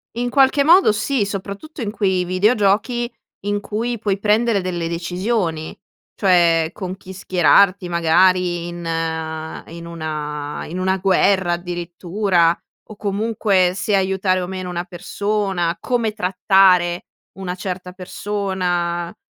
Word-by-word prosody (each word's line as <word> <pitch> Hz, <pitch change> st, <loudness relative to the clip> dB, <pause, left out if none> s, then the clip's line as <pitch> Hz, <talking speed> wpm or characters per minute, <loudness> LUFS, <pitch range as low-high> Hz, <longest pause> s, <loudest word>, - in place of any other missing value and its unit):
In 245 Hz, +1 st, -1 dB
qualche 275 Hz, +2 st, +4 dB
modo 340 Hz, -, +6 dB
sì, 215 Hz, +2 st, 0 dB
soprattutto 200 Hz, -, -6 dB
in 205 Hz, -, -2 dB
quei 190 Hz, -4 st, 0 dB
videogiochi 210 Hz, +5 st, +1 dB, 0.3 s
in 205 Hz, 0 st, 0 dB
cui 230 Hz, +3 st, -3 dB
puoi 200 Hz, -2 st, 0 dB
prendere 215 Hz, 0 st, +2 dB
delle 175 Hz, -2 st, -3 dB
decisioni, 175 Hz, -1 st, -2 dB, 0.4 s
cioè 170 Hz, -4 st, +3 dB
con 185 Hz, -2 st, -6 dB
chi 190 Hz, -1 st, -11 dB
schierarti 185 Hz, 0 st, +3 dB
magari 175 Hz, +1 st, +2 dB
in 175 Hz, 0 st, -7 dB, 0.8 s
in 170 Hz, +1 st, -9 dB
una 150 Hz, -3 st, -5 dB
in 175 Hz, +4 st, -6 dB
una 190 Hz, +1 st, +1 dB
guerra 190 Hz, -1 st, +2 dB
addirittura, 175 Hz, 0 st, 0 dB, 0.3 s
o 215 Hz, -, -9 dB
comunque 200 Hz, -3 st, +1 dB
se 205 Hz, +1 st, 0 dB
aiutare 190 Hz, -1 st, +1 dB
o 180 Hz, -, -4 dB
meno 185 Hz, -1 st, -5 dB
una 175 Hz, 0 st, -3 dB
persona, 195 Hz, -2 st, -2 dB
come 235 Hz, -4 st, -1 dB
trattare 185 Hz, -2 st, +3 dB, 0.3 s
una 185 Hz, -2 st, -4 dB
certa 180 Hz, 0 st, -5 dB
persona, 180 Hz, -3 st, -3 dB
185 Hz, 120 wpm, -20 LUFS, 175-205 Hz, 0.8 s, modo